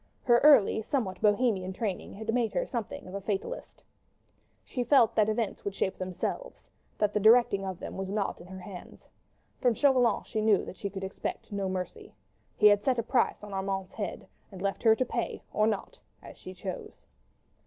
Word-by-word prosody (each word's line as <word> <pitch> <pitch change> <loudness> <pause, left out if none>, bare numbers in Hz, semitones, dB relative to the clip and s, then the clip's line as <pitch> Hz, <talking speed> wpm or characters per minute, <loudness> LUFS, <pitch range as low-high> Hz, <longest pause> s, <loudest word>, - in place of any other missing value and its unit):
Her 240 -2 +5
early, 275 -7 +6
somewhat 220 -5 -2
Bohemian 205 -3 +2
training 200 -2 -4
had 220 +2 -3
made 235 -2 +1
her - - 0
something 235 - -5
of 185 - -10
a 200 - -4
fatalist. 205 - -4 0.8
She 250 - -3
felt 245 -3 +5
that 215 -1 +3
events 220 -1 -2
would 200 -1 -4
shape 190 - -1
themselves, 185 - -5 0.3
that 210 -1 +1
the 210 - +2
directing 220 -2 +5
of 190 -2 -4
them - - -7
was 190 0 -4
not 200 -3 -2
in 175 - -12
her 190 0 -9
hands. 180 -1 -11 0.5
From 245 -3 +2
Chauvelin 255 -3 +3
she 215 - -3
knew 215 -2 +3
that - - -8
she 200 - -4
could 195 0 -7
expect 190 +2 -5
no 200 -2 -2
mercy. 185 -1 -5 0.4
He 210 - +3
had 205 -1 +6
set 255 0 +2
a 230 - 0
price 240 -2 +1
upon 205 -1 -8
Armand's 190 -1 -3
head, 205 - -5 0.2
and 190 - -9
left 195 +1 -1
it - - -17
to - - +7
her 220 - +7
to 255 - 0
pay 235 -1 -3
or 215 0 +3
not, 220 - -3 0.2
as - - -11
she 185 - -10
chose. 185 0 -7
210 Hz, 200 wpm, -29 LUFS, 190-235 Hz, 0.8 s, to